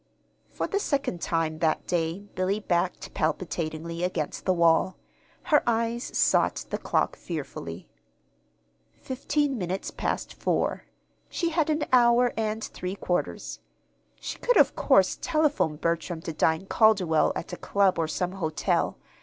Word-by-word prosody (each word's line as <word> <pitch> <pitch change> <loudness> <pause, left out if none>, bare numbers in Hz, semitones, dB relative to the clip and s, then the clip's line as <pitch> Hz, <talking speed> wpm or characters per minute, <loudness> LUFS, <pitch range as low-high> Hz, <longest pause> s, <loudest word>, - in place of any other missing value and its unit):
For - - -3
the 400 - -1
second 275 - -1
time 160 -1 -1
that 160 -1 +1
day 170 +1 -1
Billy 190 +3 0
backed 180 -3 -1
palpitatingly 165 0 -2
against 175 -4 -2
the 185 - +3
wall. 170 +2 +3 0.5
Her 305 -4 +4
eyes 230 +1 -1
sought - - +2
the - - -2
clock - - 0
fearfully. 135 - -6 1.1
Fifteen 275 0 -1
minutes 185 +1 -3
past - - -3
four. - - -1 0.4
She 340 - -1
had 320 -2 +1
an 305 0 +1
hour 245 0 +5
and 220 0 -2
three 185 +1 -5
quarters. 180 -3 -2 0.6
She - - -7
could, - - +2
of - - +5
course, - - +3
telephone 300 - +1
Bertram 165 +1 -2
to 165 - -5
dine 160 +3 +1
Calderwell 195 -7 +3
at 175 - -5
a - - -4
club 195 -3 +2
or 160 - +1
some 180 +3 -2
hotel. 165 -5 -1
185 Hz, 135 wpm, -27 LUFS, 165-235 Hz, 1.1 s, hour